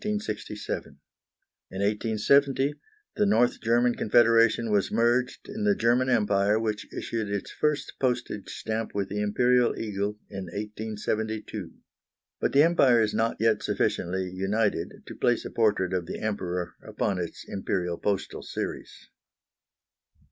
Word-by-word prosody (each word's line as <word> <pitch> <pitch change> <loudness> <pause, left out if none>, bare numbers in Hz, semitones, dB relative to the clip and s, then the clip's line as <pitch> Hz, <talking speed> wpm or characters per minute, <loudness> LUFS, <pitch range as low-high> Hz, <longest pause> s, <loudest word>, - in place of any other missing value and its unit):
In 210 - 0
1870 115 - -1 0.4
the 210 - +3
North 125 -12 +3
German 120 +1 +3
Confederation 115 0 +4
was 100 -2 +2
merged 120 +3 +1
in 215 +1 -5
the 205 -1 +3
German 125 0 +2
Empire, 105 -3 +3
which 110 -2 -3
issued 110 -3 -3
its 100 -1 -3
first 150 -1 -1
postage 125 -5 -1
stamp 110 -1 -4
with 100 -1 -1
the 105 +1 -2
Imperial 120 +4 +2
eagle 105 -1 -2
in 95 -2 -6
1872. 110 +2 -4 0.7
But - - 0
the 140 +2 +7
Empire 140 -8 +5
is 110 -2 +1
not 115 +1 0
yet 110 -1 +2
sufficiently 95 +2 -1
united 95 -1 -1
to - - -8
place 120 -1 +1
a - - -5
portrait 105 -5 +1
of 90 -2 -1
the - - -4
Emperor 90 -5 -3
upon 100 -3 -2
its 85 -2 -5
Imperial 90 -3 -2
postal 100 -2 -2
series. - - -6
110 Hz, 130 wpm, -27 LUFS, 100-120 Hz, 0.7 s, the